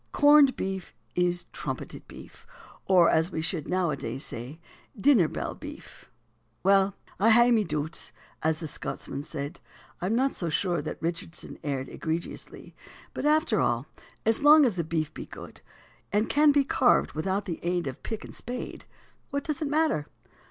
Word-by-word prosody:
Corned 290 -2 +6
beef 190 -1 -4 0.2
is 175 0 +1
trumpeted - - -6
beef, - - -13 0.4
or 180 -3 +6
as 160 +3 +2
we - - -3
should 160 -1 -2
nowadays 150 -8 -1
say, 125 +8 -7 0.4
dinner 230 - +5
bell - - -4
beef." - - -11 0.5
Well 195 0 +4 0.2
"I 215 +4 +5
hae 240 +2 +6
ma 225 -2 +5
doots," 155 -3 -2 0.3
as 160 0 +1
the 165 - -5
Scotsman 140 -1 -5
said. 145 +2 -6 0.4
I 180 - -1
am 220 - +1
not 265 +3 +2
so 170 - -3
sure 175 0 0
that 155 - -6
Richardson 170 0 -4
erred 135 -3 -2
egregiously. 165 +1 -5 0.4
But - - -1
after 310 +2 +3
all, - - +1 0.4
as 225 +3 +3
long 300 0 +8
as 230 -7 +1
the 170 - -1
beef 160 -1 -2
be - - -8
good, - - -11 0.5
and 210 +3 +2
can 295 +1 +5
be 285 -1 +4
carved 260 -2 +3
without 190 +6 -1
the 170 -4 -4
aid 175 0 -1
of 130 -2 -6
pick 220 -2 -5
and - - -11
spade, 245 +1 -6 0.4
what 280 -1 -2
does 310 0 -3
it 305 - 0
matter? 295 - +1
185 Hz, 165 wpm, -27 LUFS, 160-245 Hz, 0.5 s, long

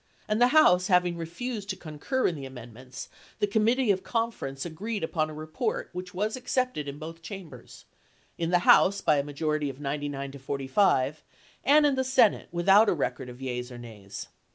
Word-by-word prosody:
'ssl'''' - - -36
and 215 +2 +1
the 245 - +7
House 220 -11 +5
having 180 -2 +3
refused 200 +6 -5
to 190 - -1
concur 170 - -3
in - - +2
the 140 -4 -7
amendments, 125 0 -10 0.3
the - - +2
Committee 220 +3 +2
of 190 -1 0
Conference 225 - -3
agi'eed 200 +5 -4
upon 155 -1 -1
a - - -8
report 430 - -3
which 180 0 -6
was 210 +4 -2
accepted 255 - -1
in 140 0 -6
both 165 +2 -8
cham 185 +1 -8
bers 125 -4 -14 0.3
— - - -37
in 165 -1 0
the 175 0 +2
House 200 +1 +6
by 155 -6 +3
a - - 0
majority 150 0 -2
of 135 0 -9
99 145 -1 -4
to 140 - -10
45, 135 +1 +1 0.4
and 295 +2 +5
in 290 - +3
the 260 0 0
Senate 255 -5 +3
without 195 +5 +5
a - - +3
record 125 -4 -3
of 125 +2 -10
yeas 125 -1 -4
or 120 - -8
nays. 105 -5 -9
165 Hz, 200 wpm, -27 LUFS, 140-215 Hz, 0.4 s, the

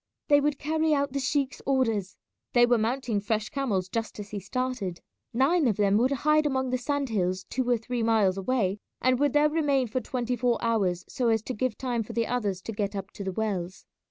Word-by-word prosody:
They 290 -1 +6
would 295 0 +1
carry 315 +1 +1
out 280 -1 -1
the 280 - 0
sheik's 275 0 -1
orders. 225 -9 0 0.4
They 240 -1 +6
were 240 -1 +3
mounting 235 -1 0
fresh 215 +1 -1
camels 215 -10 -1
just 225 +2 -4
as 205 -1 -7
he 210 - -3
started. 205 -3 -3 0.3
Nine 275 +5 +3
of 215 - +1
them 205 -1 +3
would 245 +4 +3 0.2
hide 305 0 +4
among 260 -2 -1
the 255 - 0
sand 280 +1 -1
hills 185 -3 0
two 255 -1 -1
or 240 - +4
three 235 +2 -3
miles 220 -4 +3
away, 200 -1 0 0.2
and 255 0 +2
would 285 -2 +2
there 295 0 +5
remain 290 -4 +1
for 255 +4 -2
twenty 250 -1 -2
four 245 -1 +1
hours 200 -7 0
so 250 -3 -1
as 220 -2 +2
to 255 - -4
give 255 0 -1
time 245 -3 -1
for 215 - -7
the 230 -1 +1
others 205 -7 -2
to - - -5
get 205 -1 -2
up 195 0 -5
to 200 - -7
the 190 - -2
wells. 190 -4 -3
240 Hz, 220 wpm, -27 LUFS, 205-265 Hz, 0.4 s, They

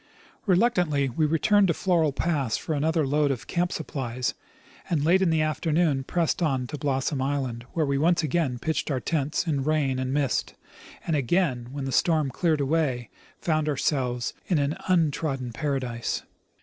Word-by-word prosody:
Reluctantly 180 - +2
we 155 +5 +1
returned 195 +6 +3
to 165 - +1
Floral 170 -5 +2
j)ass 140 -5 0
for 160 - -3
another 155 +1 +1
load 145 +1 +2
of 130 -4 -3
camp 175 0 -1
supplies, 130 -5 -3 0.6
and 150 -4 +1
late 180 +4 +4
in 190 - +3
the 160 -1 +2
afternoon 155 -1 +1
pressed 170 +4 0
on 135 -6 +1
to 150 - -6
Blossom 135 0 -1
island, 130 -4 -2
where 160 -2 +1
we 140 +1 0
again 160 -5 +1
pitched 160 +6 -2
our 135 -3 0
tents 150 +2 -1
in 145 -5 0
rain 145 -3 +1
and 130 0 -2
mist, 140 -4 0 0.5
and 165 - 0
again, 140 -3 +1
when 140 -1 -4
the 135 - -3
storm 155 -2 +2
cleared 155 +1 +1
away, 135 -5 0 0.3
found 155 -2 0
ourselves 125 -4 -1
in 175 - +2
an 140 +1 +1
un 170 -5 +3
trodden 135 -5 -3
paradise. 130 -4 -2
150 Hz, 165 wpm, -26 LUFS, 135-165 Hz, 0.6 s, late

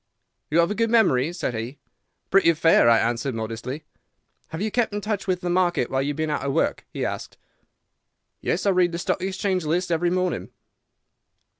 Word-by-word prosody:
"'You 155 - +1
have 170 +4 +1
a - - +1
good 230 +1 0
memory?' 165 - +3
said 175 -8 -3
he. 115 +5 -5 0.5
"'Pretty 195 -3 +5
fair,' 155 -6 +5
I 115 - +6
answered, 120 +2 -1
modestly. 115 +6 -5 0.6
"'Have 160 - -7
you 215 +2 -1
kept 240 -1 +1
in - - -1
touch 210 -1 -3
with 180 -1 0
the 175 - -2
market 175 -8 +1
while 135 - +1
you 140 - -1
have - - -11
been 155 -1 -1
out - - -1
of 135 0 -2
work?' - - 0
he - - -3
asked. - - -5 1.0
"'Yes; 185 - -1
I 200 - +4
read 180 -2 +2
the - - -2
Stock 175 - -1
Exchange 190 -1 -1
List 175 +4 -1
every 170 +1 +2
morning. 180 0 -1
175 Hz, 195 wpm, -24 LUFS, 135-185 Hz, 1.0 s, I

